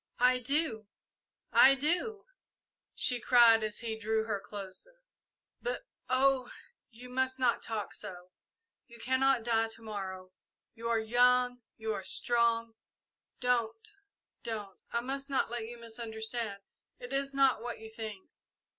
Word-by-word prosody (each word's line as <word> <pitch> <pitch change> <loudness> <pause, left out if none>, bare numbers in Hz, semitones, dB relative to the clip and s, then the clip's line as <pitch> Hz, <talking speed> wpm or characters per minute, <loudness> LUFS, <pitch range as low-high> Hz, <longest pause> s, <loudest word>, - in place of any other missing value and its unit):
"I 250 +1 +4
do 250 -5 0 0.7
I 275 +1 +8
do," 350 +9 0 0.7
she 250 -1 +2
cried, 230 -3 +6
as 215 -1 -2
he 225 -2 -3
drew 220 0 0
her 215 -2 -2
closer; 205 - -9 0.6
"but, - - -3 0.3
oh, 260 -1 +3 0.4
you 245 +1 -11
must 260 +1 0
not 250 -2 +2
talk 220 -3 -4
so! 180 0 -7 0.6
You 235 -2 -14
cannot 260 0 +2
die 225 -1 +2
to 225 0 -9
morrow 190 -3 -6 0.4
you 230 +1 -5
are 230 - +3
young 245 +2 +3 0.2
you 220 0 -2
are 190 - -4
strong! 230 +1 +1 0.7
Don't! 230 -3 0 0.5
Don't! 210 -4 -5
I 235 - 0
must 275 +3 -4
not 265 -4 0
let 235 -2 -3
you 240 +1 -8
misunderstand! 225 -2 -5 0.3
It 245 +2 -8
is 275 0 0
not 275 -4 +3
what 240 0 -5
you 220 - -9
think!" 220 -3 -7
235 Hz, 135 wpm, -32 LUFS, 220-255 Hz, 0.7 s, I